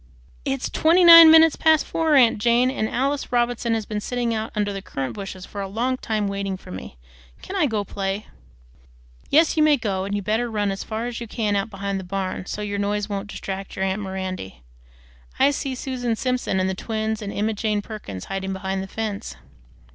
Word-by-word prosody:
It's 135 - -1
TWENTY 340 +3 +3
NINE 335 -1 +11
minutes 320 -1 +7
past 315 -1 +3
four, 320 -2 +1
aunt 240 -5 +5
Jane, 240 +3 +3
and 220 -5 -2
Alice 275 +3 -1
Robinson 240 -1 +1
has 220 -2 -3
been 210 0 -4
sitting 240 0 -1
under 215 -2 -2
the 195 - -5
currant 135 -8 -4
bushes 195 -2 -7
for 200 - -7
a 195 - -3
long 235 +6 -1
time 215 -4 -2
waiting 195 -1 -3
for - - -13
me. 90 -8 -8 0.5
Can 395 - -6
I 345 -6 +3
go 220 -4 -1
and 200 - -8
play?" 195 +1 -3 1.0
"Yes, 320 +3 +4
you 315 - +2
may 305 -1 +5
go, 195 -5 -2
and 200 +1 -3
you'd 205 - -2
better 225 +3 0
run 205 -2 -1
as 195 - -4
far 220 +1 -4
as 240 -1 -5
you 235 - -5
can 215 -2 -1
out 200 +2 -1
behind 200 -1 -3
the - - -7
barn, 185 0 -4
so 210 - -4
't - - -3
your 200 0 -3
noise 205 +1 -1
won't 200 0 -4
distract 195 -1 -6
your 190 - -1
aunt 190 +2 -1
Mirandy. 185 - -6 0.7
I 280 - +4
see 275 -2 -3
Susan 245 -3 -2
Simpson 250 -5 -1
and 185 - +1
the 190 - -1
twins 220 +2 -3
and 205 -1 -5
Emma 215 +2 -1
Jane 210 -1 -1
Perkins 150 - -8
hiding 195 0 -4
behind 190 0 -3
the 195 - -6
fence." 205 - -5
210 Hz, 215 wpm, -23 LUFS, 195-245 Hz, 1.0 s, NINE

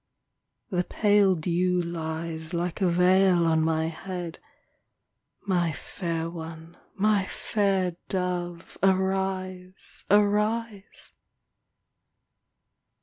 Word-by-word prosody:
The 180 -1 +1
pale 205 -1 +3
dew 180 +2 +1
lies 165 -1 -4
Like 175 +3 -2
a 185 - +4
veil 180 0 +4
on 160 -1 +3
my 160 0 +1
head. 175 +1 -5 1.1
My 175 -4 +1
fair 165 +1 -4
one, 165 0 -8 0.2
my 205 -1 +2
fair 195 -4 0
dove. 175 -2 -3
Arise, 190 -1 -1
arise 210 +1 +1
180 Hz, 85 wpm, -26 LUFS, 170-195 Hz, 1.1 s, a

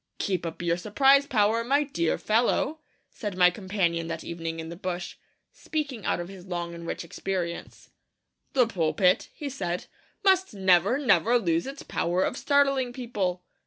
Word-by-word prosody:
'Keep 185 -4 -1
up 165 +1 -6
your 170 0 +1
surprise 270 +9 +4
power, 220 0 +2
my 280 +5 +2
dear 170 - -1
fellow,' 240 +7 +1 0.3
said 205 -5 -5
my 180 -1 +6
companion 180 -4 -1
that 165 -1 -5
evening 165 -1 -5
in 160 0 -6
the 170 - -7
bush, 175 0 -5 0.4
speaking 285 - -4
out - - +1
of 175 - -4
his 190 -1 -11
long 175 -1 -4
and 170 0 -8
rich - - -4
experience. 170 0 -5 0.6
'The 255 -2 +5
pulpit,' 180 -2 +1
he 295 - -6
said, 180 -10 -3 0.4
'must 380 - +3
never, 190 +4 +4
never 235 - +3
lose 170 -3 0
its 275 +2 -7
power 180 +2 0
of - - -1
startling 275 -3 +2
people!' 205 -8 -3
190 Hz, 160 wpm, -27 LUFS, 175-250 Hz, 0.6 s, my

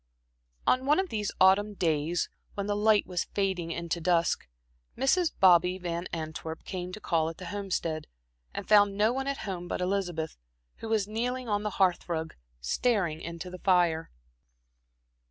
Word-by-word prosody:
On 255 +1 +2
one 300 +5 +4
of 380 -1 -1
these 210 -2 -2
autumn 200 +2 +5
days, 160 -1 0 0.3
when 200 - -2
the 205 0 0
light 210 0 +4
was 180 -2 -2
fading 190 -4 -1
into 170 0 -3
dusk, 170 - +1 0.5
Mrs. 315 +7 +2
"Bobby" 180 0 +5
Van 175 -1 -3
Antwerp 160 0 -5
came 180 -1 -5
to 215 - -6
call 165 -5 +1
at 165 - -9
the 185 - -8
Homestead, 175 -6 -2 0.4
and - - -6
found 205 -2 +5
no 215 +3 +3
one 270 +1 -2
at 275 0 -1
home 180 -3 -4
but - - -3
Elizabeth, 180 -4 -2 0.4
who 225 - -7
was 215 -3 +1
kneeling 245 +3 -2
on 205 -1 0
the 210 - -1
hearth 185 -2 +2
rug, 160 -1 -2 0.3
staring 170 - 0
into 170 +2 -6
the 185 - -8
fire. 175 -4 +2
185 Hz, 165 wpm, -29 LUFS, 170-210 Hz, 0.5 s, autumn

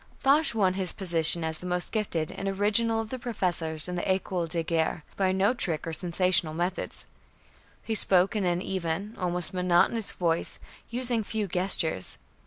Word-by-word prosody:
Foch 280 -1 +3
won 190 -4 +3
his 190 -1 -1
position 170 -2 +1
as 160 -1 -2
"the 180 - -7
most 180 0 +1
gifted 175 -8 -2
and 195 - -5
original 215 +3 +2
of 225 -1 -5
the 260 - -4
professors 175 - -1
in 180 - -4
the 175 - -2
École 185 -3 -1
de 165 0 -1
Guerre" 160 -1 -1
by 190 -1 +1
no 190 +5 +2
trick 165 -10 -3
or 165 - -4
sensational 175 -1 +1
methods. 175 +2 -3 0.8
He 225 - -2
spoke 190 -1 +3
in 210 - 0
an 175 0 0
even, 190 +3 -3
almost 180 0 +1
monotonous 180 +4 +2
voice, 170 -2 -1 0.3
using 240 -2 0
few 215 0 -3
gestures. 180 - +2
185 Hz, 170 wpm, -27 LUFS, 170-210 Hz, 0.8 s, Foch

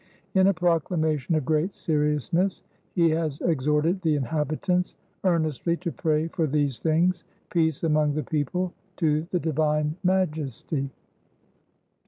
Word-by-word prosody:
In 190 -1 +5
a 200 - +5
proclamation 160 -3 +1
of 155 -4 0
great 155 +6 +1
seriousness, 150 - 0 0.3
he 170 -2 +4
has 155 -3 -1
exhorted 155 +4 +1
the 160 -4 +2
inhabitants 155 +6 -1 0.3
earnestly 170 -2 +1
to 170 -1 -4
pray 155 0 0
for 160 -1 0
these 145 -3 0
things 170 +2 +2 0.3
[peace 160 -3 +1
among 150 -2 +2
the 155 - -1
people] 175 +4 -1 0.2
to 155 -1 +1
the 180 - 0
Divine 150 -1 0
Majesty. 155 -6 -1
160 Hz, 125 wpm, -26 LUFS, 150-170 Hz, 0.3 s, In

